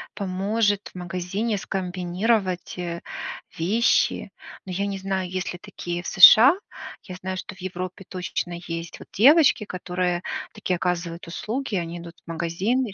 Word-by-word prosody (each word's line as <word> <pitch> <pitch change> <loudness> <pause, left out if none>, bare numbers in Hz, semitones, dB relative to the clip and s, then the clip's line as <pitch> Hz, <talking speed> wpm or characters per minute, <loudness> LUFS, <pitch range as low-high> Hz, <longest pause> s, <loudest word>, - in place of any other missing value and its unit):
поможет 205 +2 0
в - - -47
магазине 180 +5 -2
скомбинировать, 185 +1 -1
э, 170 -1 -4 0.6
вещи, 205 +8 +2 0.3
но 190 - -6
я 195 +3 -1
не 200 -1 -3
знаю, 190 -1 -2
есть 185 0 -3
ли 180 - -9
такие 175 -4 -5
в - - -6
США, 225 - +9 0.5
я 185 - -8
знаю, 185 +1 -4
что - - -6
в - - -19
Европе 185 +1 -5
точно 180 -1 -3
есть 165 0 -5
вот - - -13
девочки, 275 - +6
которые 180 -1 -2 0.3
такие 180 - -1
оказывают 175 -1 -2
услуги, 225 +7 -3
они 170 -1 -3
идут 170 0 -10
в - - -15
магазин 175 +10 0
и 210 - -7
185 Hz, 155 wpm, -24 LUFS, 175-200 Hz, 0.6 s, США